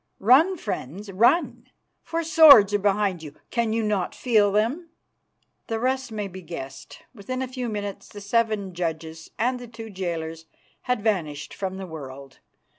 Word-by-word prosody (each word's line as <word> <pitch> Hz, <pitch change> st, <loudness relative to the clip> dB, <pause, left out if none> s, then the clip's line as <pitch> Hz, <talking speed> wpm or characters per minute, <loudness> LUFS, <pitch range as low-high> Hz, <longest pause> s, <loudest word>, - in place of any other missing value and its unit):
Run, 290 Hz, -, +5 dB
friends, 195 Hz, -, -6 dB
run, 235 Hz, -, +2 dB, 0.3 s
for 335 Hz, 0 st, -3 dB
swords 290 Hz, -11 st, +8 dB
are 205 Hz, -, +3 dB
behind 200 Hz, -3 st, +1 dB
you. 150 Hz, -2 st, -10 dB, 0.2 s
Can 235 Hz, -2 st, 0 dB
you 225 Hz, 0 st, 0 dB
not 205 Hz, -4 st, -1 dB
feel 215 Hz, -5 st, +3 dB
them?" 240 Hz, -, 0 dB, 0.8 s
The 225 Hz, -1 st, -2 dB
rest 260 Hz, 0 st, -1 dB
may 210 Hz, -2 st, -3 dB
be 190 Hz, 0 st, -10 dB
guessed. 155 Hz, -6 st, -9 dB
Within 255 Hz, +4 st, -4 dB
a -, -, -4 dB
few 250 Hz, -1 st, -4 dB
minutes 205 Hz, -2 st, -5 dB
the 205 Hz, -, -10 dB
seven 205 Hz, -2 st, 0 dB
judges 160 Hz, -2 st, -5 dB
and 250 Hz, +2 st, 0 dB
the 245 Hz, -, -9 dB
two 225 Hz, -1 st, -10 dB
jailers 165 Hz, -3 st, -5 dB, 0.4 s
had 250 Hz, -5 st, 0 dB
vanished 165 Hz, -10 st, -2 dB
from 190 Hz, -1 st, -4 dB
the 190 Hz, -, -6 dB
world. 140 Hz, -4 st, -10 dB
205 Hz, 160 wpm, -24 LUFS, 175-235 Hz, 0.8 s, swords